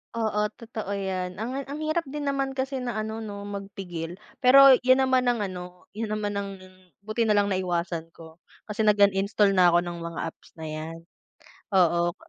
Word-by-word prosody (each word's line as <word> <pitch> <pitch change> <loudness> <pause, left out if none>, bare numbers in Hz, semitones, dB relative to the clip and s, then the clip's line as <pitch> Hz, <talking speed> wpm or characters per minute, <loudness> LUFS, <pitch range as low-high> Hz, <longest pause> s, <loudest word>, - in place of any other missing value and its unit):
Oo 215 -2 0 0.2
totoo 225 -3 -6
yan, 190 -1 -3
ang 245 +4 -3
ang 285 +3 -7
hirap 310 +2 0
din 290 +1 -5
naman 275 -1 0
kasi 265 -1 -3
na 240 -3 -3
ano 220 +1 -4
no 205 -1 -7
magpigil. 195 -3 -6 0.2
Pero 270 +1 +9
yun 255 +1 +5
naman 260 -1 +3
ang 245 -2 +1
ano 180 -2 -6
yun 220 -1 -3
naman 205 -1 -2
ang 200 0 -2 0.5
buti 215 +3 -1
na 215 - +2
lang 205 -1 +3
naiwasan 175 -3 -2
ko 160 -1 -14 0.3
kasi 215 +1 -2
nag-uninstall 200 -1 +3
na 180 -2 +6
ako 175 - +5
ng 175 0 -5
mga 170 0 -6
apps - - -12
na 160 - -6
yan 155 +2 -6 0.8
oo. 175 -1 +3
205 Hz, 175 wpm, -26 LUFS, 180-235 Hz, 0.8 s, Pero